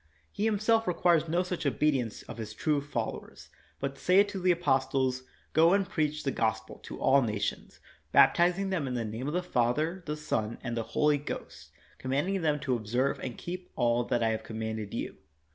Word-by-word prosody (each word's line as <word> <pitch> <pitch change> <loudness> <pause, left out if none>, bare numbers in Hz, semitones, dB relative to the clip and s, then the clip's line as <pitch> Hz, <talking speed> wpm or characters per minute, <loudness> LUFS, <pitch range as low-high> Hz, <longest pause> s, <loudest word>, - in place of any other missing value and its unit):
He 210 - -2
himself 225 +1 +2
requires 170 -2 +3
no 175 +3 +2
such 180 -1 -4
obedience 135 -4 0
of 115 - -9
his 110 -1 -6
true 150 +1 +1
followers, 120 -6 -5 0.3
but 135 0 -4
saith 195 +3 +4
to 200 -1 -4
the 185 0 +1
apostles, 135 -6 +1 0.3
''Go 165 +4 +6
and 195 -2 +1
preach 155 -5 -1
the 135 - 0
Gospel 110 -2 -2
to - - -9
all 135 +1 +5
nations, 105 -4 -3 0.3
baptizing 180 +3 +4
them 165 -7 -1
in 125 - -3
the 115 -2 -1
name 110 +5 -4
of 150 - -2
the 180 - 0
Father, 155 +5 0
the 150 0 -2
Son, 115 -7 -2
and 120 -2 -3
the 115 - 0 0.2
Holy 150 -1 +4
Ghost, 145 - -7 0.3
command 135 +7 -1
ing 195 -1 0
them 150 -2 +1
to 130 -3 0
observe 120 +4 0
and 125 -3 -5
keep 180 +1 -6
all 120 0 +2
that 120 -1 0
I 115 - +3
have 110 0 -1
com 110 - -7
manded 110 -2 -4
you. - - -4
140 Hz, 195 wpm, -29 LUFS, 120-175 Hz, 0.3 s, Go